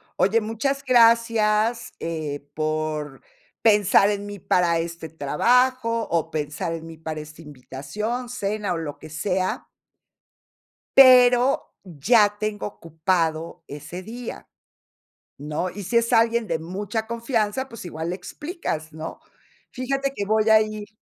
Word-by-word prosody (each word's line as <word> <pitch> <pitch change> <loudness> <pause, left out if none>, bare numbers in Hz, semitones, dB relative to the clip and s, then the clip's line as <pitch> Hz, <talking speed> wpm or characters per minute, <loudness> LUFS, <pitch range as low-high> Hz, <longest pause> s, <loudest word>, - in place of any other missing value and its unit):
"Oye, 215 +4 +3
muchas 230 +6 -2
gracias, 230 -2 +3
eh, 150 -3 -4
por 155 -2 -3 0.4
pensar 205 -2 +5
en 205 0 -4
mí 205 0 -7
para 175 -2 +2
este 165 -1 -5
trabajo, 230 - +1
o 170 -2 0
pensar 150 +2 -3
en 165 0 -6
mí 165 -1 -10
para 160 -1 -5
esta 155 +2 -11
invitación, 155 - -5
cena, 210 -5 -2
o - - -2
lo 155 -3 -6
que 155 - -11
sea" 185 +3 -2 1.3
"pero, 250 0 +6
ya 205 - +3
tengo 215 -1 -2
ocupado 165 -2 -2
ese 150 +6 -8
día", 235 +4 -8 0.9
¿no?, 150 +5 -3
y 205 +2 -8
si 235 +6 +1
es 230 0 +1
alguien 230 -1 +3
de 165 -2 -1
mucha 205 +6 -4
confianza, 235 +1 -1
pues 230 -7 -10
igual 160 0 -5
le - - -2
explicas, 180 - -5
¿no?, 160 - -7 0.5
"Fíjate 275 +2 -2
que 200 - -2
voy 215 +1 +2
a 220 0 +7
ir". 215 -1 -4
205 Hz, 135 wpm, -23 LUFS, 160-230 Hz, 1.3 s, a